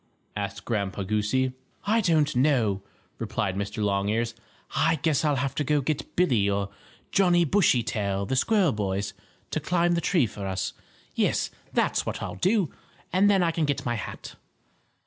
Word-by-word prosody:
asked 100 -1 -4
Grandpa 100 -4 -1
Goosey. 110 +6 0 0.3
"I 225 +3 +3
don't 155 -6 +2
know," 120 -7 +2 0.4
replied 95 - -2
Mr. 100 +2 -3
Longears. 105 +4 0 0.4
"I 160 +3 +3
guess 160 -3 +2
I'll 150 -2 +2
have 135 0 -1
to 150 - -1
go 150 +1 +2
get 145 +2 -3
Billie 120 - +3
or 100 0 -1 0.4
Johnnie 175 -3 +4
Bushytail, 115 - +1
the 130 - -1
squirrel 195 - +3
boys, 100 -2 -2 0.4
to - - 0
climb 175 +3 +1
the 170 0 +1
tree 165 -8 +3
for 100 -2 -6
us. 95 0 -2 0.4
Yes, - - +1 0.2
that's - - +1
what - - -4
I'll - - -4
do; 190 -3 +1 0.4
and 195 +3 +5
then 195 -3 +4
I 170 - +2
can 160 -1 0
get 145 -2 -1
my 120 - 0
hat." 110 - -6
130 Hz, 165 wpm, -26 LUFS, 100-165 Hz, 0.4 s, and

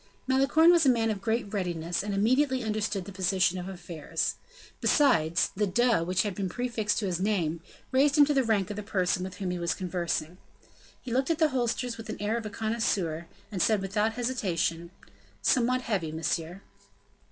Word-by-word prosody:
Malicorne 275 +6 +5
was 340 -2 +5
a 275 - +5
man 225 -3 +2
of 200 -2 -4
great 220 -1 -1
readiness 175 -3 -2
and 205 +1 -4
immediately 255 +6 +2
understood 210 -3 -2
the 200 - -8
position 185 -1 +1
of 180 +1 -6
affairs. 175 -5 -3 0.5
Besides, 170 - +3
the 205 +1 +1
"de" 230 -1 +2
which 180 +1 +1
had 205 -2 -2
been 190 0 -3
prefixed 235 -2 -1
to 215 - -1
his 180 -3 -1
name, 175 -5 0 0.3
raised 280 +3 +3
him 290 - +8
to 295 - +1
the 270 -2 +3
rank 210 -4 0
of - - -5
the - - -3
person 185 -3 0
with 185 0 -6
whom 185 -2 -3
he 180 - -3
was 170 -1 -1
conversing. 175 -2 -3 0.6
He 245 - -5
looked 265 +4 +1
at 330 - +1
the 315 -1 +3
holsters 245 -2 -1
with 225 - -9
the 215 - -6
air 210 +2 -1
of 230 -2 -3
a - - -5
connoisseur 205 -7 -1 0.2
and 190 -4 -2
said, 215 +2 +3
without 210 +3 0
hesitation: 180 -9 -1 0.5
"Somewhat 255 0 +2
heavy, 195 -10 -2
monsieur." 165 +3 -3
205 Hz, 190 wpm, -28 LUFS, 180-240 Hz, 0.6 s, him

